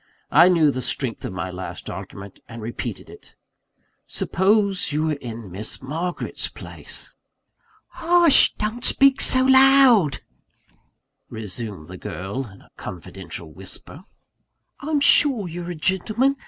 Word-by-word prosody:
I 180 - +7
knew 160 -5 +4
the 130 - -4
strength 125 0 -3
of - - -5
my 90 0 -4
last 90 -1 -8
argument, 100 +1 -9
and 115 - -9
repeated 115 +2 -6
it: - - -16 0.7
"Suppose 195 -2 +1
you 150 +1 -1
were 160 -1 0
in 115 -8 -8
Miss 105 +5 -6
Margaret's 165 +7 -3
place?" - - -10 0.8
"Hush! 340 -3 +4
don't 220 +3 -4
speak 275 -1 +4
so 255 0 +6
loud," 265 - +5 1.1
resumed 105 -5 -5
the 95 - -10
girl 95 +11 -6
in 95 -2 -16
a - - -25
confidential 85 -2 -8
whisper. 95 - -9 0.7
"I'm 295 0 -1
sure 265 -8 +4
you're 175 +1 -7
a 175 - -5
gentleman. 215 - 0
150 Hz, 125 wpm, -22 LUFS, -, 1.1 s, I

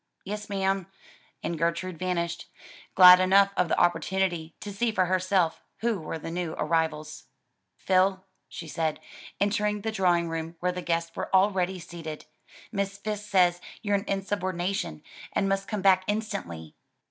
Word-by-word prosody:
"Yes 210 +2 -5
ma'am," 195 -2 0 0.6
and 170 -2 -3
Gertrude 170 +1 -1
vanished; 170 -2 -2 0.5
glad 180 -1 +10
enough 195 +2 +5
of 180 - +2
the - - +1
opportunity 175 -2 0
to 205 - -7
see 230 +3 0
for 190 -4 +2
herself 185 -2 +1 0.2
who 230 -3 0
were 160 0 -5
the 165 +1 -7
new 170 -2 -3
arrivals. 160 -2 -1 0.5
"Phil," 190 0 +2 0.2
she 165 - -8
said, 160 -1 -2 0.4
entering 210 0 +1
the 220 +2 -2
drawing 175 -4 +2
room 165 0 -4
where 180 0 0
the 180 0 -5
guests 165 -1 -2
were - - -4
already 190 -1 +2
seated, 165 -3 -8 0.5
"Miss 200 -1 -2
Fisk 210 0 -5
says 180 -2 +3 0.2
you're 205 -1 0
an 200 0 +1
insubordination 185 - -2 0.3
and 195 - +1
must 195 0 0
come 210 -3 -3
back 190 -1 +5
instantly." 200 - -4
185 Hz, 150 wpm, -27 LUFS, 170-200 Hz, 0.6 s, glad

